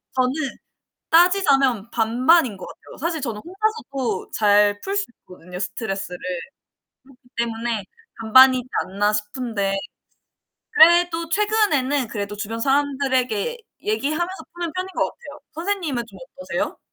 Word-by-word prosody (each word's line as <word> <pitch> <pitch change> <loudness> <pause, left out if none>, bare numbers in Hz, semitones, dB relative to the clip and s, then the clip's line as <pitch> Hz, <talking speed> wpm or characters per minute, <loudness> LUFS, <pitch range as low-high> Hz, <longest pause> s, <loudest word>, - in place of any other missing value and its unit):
저는 255 -1 +2 0.8
따지자면 280 - +4
반반인 240 - +3
것 185 - -9
같아요. - - -13
사실 325 +2 -2
저는 230 -6 -4
혼자서도 335 - -3
잘 205 -1 +3
풀 395 - -3
수 405 - +1 0.2
있거든요, 180 0 -11
스트레스를. 195 -2 -4 1.0
그렇기 245 - -26
때문에 230 -2 -2 0.4
'반반이지 255 +3 +6 0.2
않나?' 205 +3 0
싶은데. 210 -2 -2 1.0
그래도 345 -3 +5
최근에는 330 - +1
그래도 205 -1 -5
주변 220 +2 -4
사람들에게 270 - 0 0.2
얘기하면서 310 - -2
푸는 345 -1 -4
편인 370 +2 -3
것 - - +2
같아요. 480 - -10
선생님은 330 -7 -2
좀 - - -14 0.2
어떠세요? - - -3
255 Hz, 310 characters per minute, -22 LUFS, 215-335 Hz, 1.0 s, 반반이지